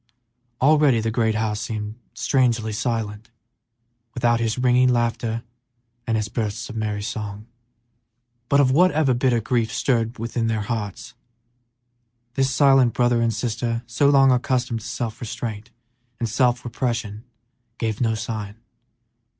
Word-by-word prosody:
Already 145 -3 +4
the 110 0 -1
great 110 -1 +1
house 110 -1 -1
seemed 105 -1 -4 0.2
strangely 120 -5 +1
silent 110 -2 -3 0.9
without 120 -1 +2
his 115 0 -1
ringing 125 0 +4
laughter, 115 -1 0 0.6
his 110 -2 0
bursts 115 +3 -3
of - - -9
merry 105 -2 -2
song. 105 -1 -5 1.0
But 140 - +4
of 130 -2 +4
whatever 155 -3 +4
bitter 125 -1 +2
grief 115 0 0
stirred 115 -2 0
their 115 -1 -2
hearts, 105 -3 -4 1.2
this 135 +1 +1
silent 135 -2 +4
brother 120 -1 +2
and 115 0 +2
sister, 115 +1 -2
so 130 +5 +2
long 135 -2 +6
accustomed 125 -2 0
to 105 - -9
self 115 -2 -4
restraint 115 -1 -5 0.5
and 115 - -1
self 125 +2 +1
repression, 115 -3 -3 0.5
gave 110 -1 -2
no 115 -2 +2
sign. 110 -2 -5
115 Hz, 125 wpm, -23 LUFS, 110-125 Hz, 1.2 s, long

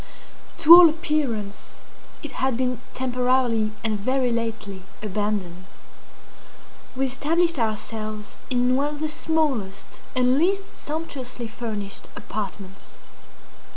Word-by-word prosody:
To 335 0 +9
all 345 -1 +11
appearance 285 -11 -2 0.4
it 300 - -6
had 260 -3 0
been 250 -1 -1
temporarily 250 -3 +1
and 215 -2 0
very 255 +3 +1
lately 220 -4 -3 0.2
abandoned. 200 -3 -2 1.3
We 270 +1 +1
established 320 +5 +1
ourselves 215 -1 -3
in 250 0 +2
one 280 +2 +1
of - - -10
the 310 0 -1
smallest 290 -12 -1
and 255 +1 +3
least 390 +4 0
sumptuously 275 -6 -5
furnished 215 -3 -6
apartments. 200 -1 -7
250 Hz, 105 wpm, -24 LUFS, 215-290 Hz, 1.3 s, all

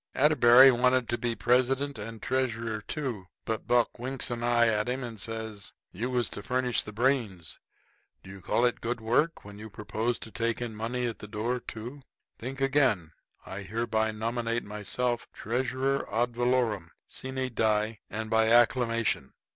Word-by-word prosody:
Atterbury 130 -3 +7
wanted 125 0 +2
to 120 - 0
be 120 -2 -1
president 130 +2 +1
and 110 +1 -7
treasurer 115 -4 -1
too, 120 -6 -4 0.2
but 110 -1 -3
Buck 120 0 +2
winks 130 +1 0
an 120 -1 -3
eye 120 0 +4
at 105 0 +1
him 130 +1 -2
and 115 -3 -6
says: 110 -2 -6 0.2
"You 115 +7 -3
was 125 -2 0
to - - -5
furnish 125 +2 0
the 105 - -8
brains. 110 - -1 0.6
Do 95 - -11
you 100 -1 -10
call 120 - +2
it 120 - 0
good 120 +2 -1
brain 110 -1 -12
work 150 +6 +1
when 105 0 -10
you 110 +1 -8
propose 110 +3 -2
to 110 - -9
take 115 +3 -1
in 120 -3 -4
money 120 +3 -2
at 115 -2 -3
the 105 - -8
door, 115 +4 -2
too? 120 +5 -8 0.4
Think 135 +3 -6
again. 130 - +2 0.3
I 95 - -6
hereby 110 +2 -1
nominate 115 +2 -2
myself 110 +4 -2
treasurer 130 +3 -1
ad 120 +2 0
valorem, 120 -7 +1 0.2
sine 130 0 -4
die, 110 0 +1
and 110 +1 -4
by 110 0 +4
acclamation. 115 - +3
120 Hz, 170 wpm, -28 LUFS, 110-125 Hz, 0.6 s, Atterbury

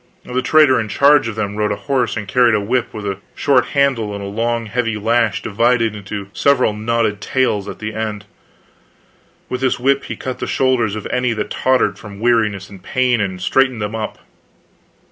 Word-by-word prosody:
The 125 +1 -1
trader 150 -1 +5
in 110 - -2
charge 140 +4 +4
of 115 - -4
them 105 -1 -3
rode 105 -1 0
a - - 0
horse 130 -5 -1
and 105 -1 -5
carried 120 +2 +4
a - - +2
whip 120 +4 -1
with 105 -1 -7
a 100 -1 -3 0.2
short 135 -3 +3
handle 120 -7 +1
and 100 - -6
a - - -5
long 115 +3 -1
heavy 115 0 -1
lash 110 -3 +1
divided 115 0 +1
into 100 -1 -7
several 135 -6 +2
knotted 110 -1 -1
tails 105 -4 0
at - - -7
the 110 0 -5
end. 105 -1 -4 1.2
With 125 0 -4
this 130 -1 +1
whip 135 +2 +1
he - - -5
cut 130 -1 -5
the - - -3
shoulders 125 -5 +1
of 110 - -6
any 125 -1 +1
that 105 -1 -4
tottered 130 0 +1
from 100 -2 -10
weariness 110 -5 +1
and 100 -2 -13
pain, 125 +2 +1
and 95 -2 -3
straightened 130 +5 +2
them 105 0 -3
up. 110 -1 -4
115 Hz, 195 wpm, -18 LUFS, 105-125 Hz, 1.2 s, trader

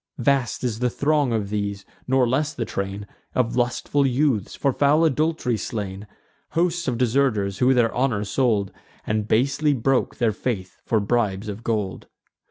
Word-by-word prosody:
Vast 130 0 +1
is 115 -3 -1
the 125 0 +1
throng 145 0 +1
of 105 -3 -1
these; 100 -1 -3 0.2
nor 130 -1 +3
less 145 +6 0
the 115 - -2
train 100 +1 -4 0.3
Of 120 -2 +1
lustful 125 +3 +1
youths, 130 -5 +1
for 140 -2 +1
foul 150 +4 +3
adult'ry 155 -5 +1
slain: 100 -2 -5 0.5
Hosts 170 -1 0
of 125 -2 0
deserters, 115 -6 +1
who 130 +1 +4
their 120 -2 +3
honour 120 -5 0
sold, 105 -2 +1 0.3
And 105 0 -1
basely 140 +6 +2
broke 130 +1 +1
their 115 -3 +1
faith 100 -5 -4
for 110 - +2
bribes 105 -2 0
of 105 +2 -6
gold. 105 -5 -2
120 Hz, 160 wpm, -23 LUFS, 105-135 Hz, 0.5 s, who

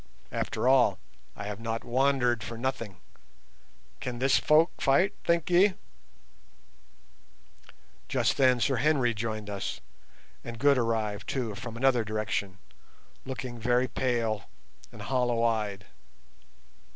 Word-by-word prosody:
After - - -2
all, 125 -7 +4 0.4
I 100 - -7
have 105 0 -5
not 115 0 -3
wandered 125 -2 +2
for 115 +1 -6
nothing. 115 -6 -3 1.0
Can 125 -3 -4
this 135 +2 +3
folk 155 +2 +3
fight, 140 +9 +3
think 170 -2 +1
ye?" 185 +2 +5 2.3
Just - - +1
then 130 -2 +4
Sir 135 +2 +1
Henry 130 -2 +2
joined 110 -1 -4
us, 100 -1 -4 0.6
and 120 -1 -7
Good 140 +2 +4
arrived, 110 -3 -1
too, 120 -5 -2
from 115 +3 -7
another 125 -2 +3
direction, 105 -3 -3 0.7
looking 130 -2 -5
very 125 +2 +2
pale 115 -5 -1 0.4
and - - -10
hollow 120 -3 0
eyed. 105 -4 -1
120 Hz, 115 wpm, -28 LUFS, 110-130 Hz, 2.3 s, ye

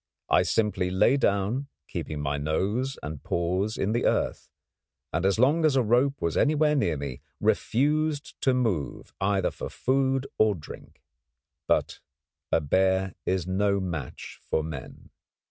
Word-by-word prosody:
I - - +6
simply 105 -5 +1
lay 95 +8 +4
down, 110 +2 +1 0.2
keeping 75 -1 -4
my 70 0 -1
nose 100 - -1
and 75 -1 -6
paws 90 +5 -1
in 100 - 0
the 120 - 0
earth, - - 0 0.6
and, 85 +4 +1
as 100 - +2
long 145 +8 +3
as 155 -3 +4
a 130 - +4
rope 125 +5 +2
was 85 -1 0
anywhere 150 0 +3
near 85 - +1
me, 70 -3 -6 0.2
refused 150 +4 +1
to 130 -2 +3
move 105 - -2
either 95 -1 +1
for - - -6
food 135 0 +1
or 110 -2 +4
drink. 75 -4 -12 0.6
But - - +1 0.5
a - - +4
bear 95 +4 +1
is 95 -2 0
no 100 +2 +1
match 85 -8 -5
for 80 - -1
men. 75 -5 -8
100 Hz, 145 wpm, -27 LUFS, 85-130 Hz, 0.6 s, I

